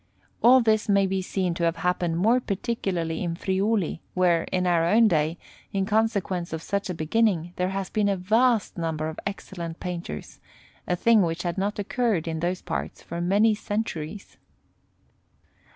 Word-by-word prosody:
All 255 +3 +7
this 215 -2 +2
may 200 -1 +4
be 190 0 -1
seen 185 -1 -1
to 170 - -3
have 165 0 +1
happened 175 0 0
more 225 +8 +4
particularly 190 -7 -2
in 170 -1 -2
Friuli, 190 0 0
where, 175 -2 +3
in 185 0 -1
our 170 -2 +3
own 220 +7 +5
day, 160 -2 +1 0.4
in 195 -1 +1
consequence 200 -5 0
of 160 0 -4
such 200 -1 -2
a 180 - -2
beginning, 175 0 +1
there 180 0 0
has 195 -1 -4
been 210 -1 +1
a 195 - +1
vast 220 +2 +2
number 160 -2 -2
of 160 - -7
excellent 175 -4 -6
painters 170 - -6 0.5
a 180 - +1
thing 225 +4 +4
which 170 -1 -1
had 175 0 -2
not 205 +2 -1
occurred 205 -4 0
in 160 -1 -2
those 180 +2 -2
parts 165 - -4
for 170 +1 -5
many 205 +5 +3
centuries. 205 -4 -4
185 Hz, 170 wpm, -25 LUFS, 170-210 Hz, 0.5 s, All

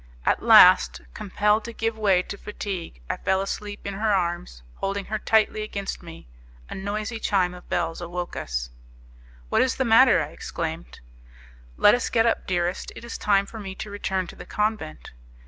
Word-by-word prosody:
At - - +2
last, 65 -2 +7
compelled 210 +2 +1
to 235 - -6
give 225 0 -2
way 195 -4 +2
to 200 - -7
fatigue, 195 - -6
I - - -2
fell 190 0 +1
asleep 205 +1 -5
in 200 - -3
her 215 +2 0
arms, 175 - -2
holding 195 0 -3
her 215 0 -3
tightly, 215 -1 +2
against 200 -2 -5
me. 165 - -12 0.4
A - - -3
noisy 210 +4 -4
chime 185 -5 +1
of 180 - -13
bells 165 0 -1
woke 175 0 -5
us. - - -4 0.8
"What - - +3
is 260 - +1
the 265 - 0
matter?" 235 0 +6
I 145 - -7
exclaimed. 165 +1 -6 0.8
"Let 205 - +6
us 245 - 0
get 225 -1 +3
up, 230 - 0
dearest; 175 -1 -1
it - - -9
is 235 - -7
time 200 -1 +3
for 220 +2 -9
me 190 -2 -7
to 210 - -7
return 190 -2 -2
to - - -11
the - - -11
convent." 210 - -3
195 Hz, 180 wpm, -25 LUFS, 175-215 Hz, 0.8 s, last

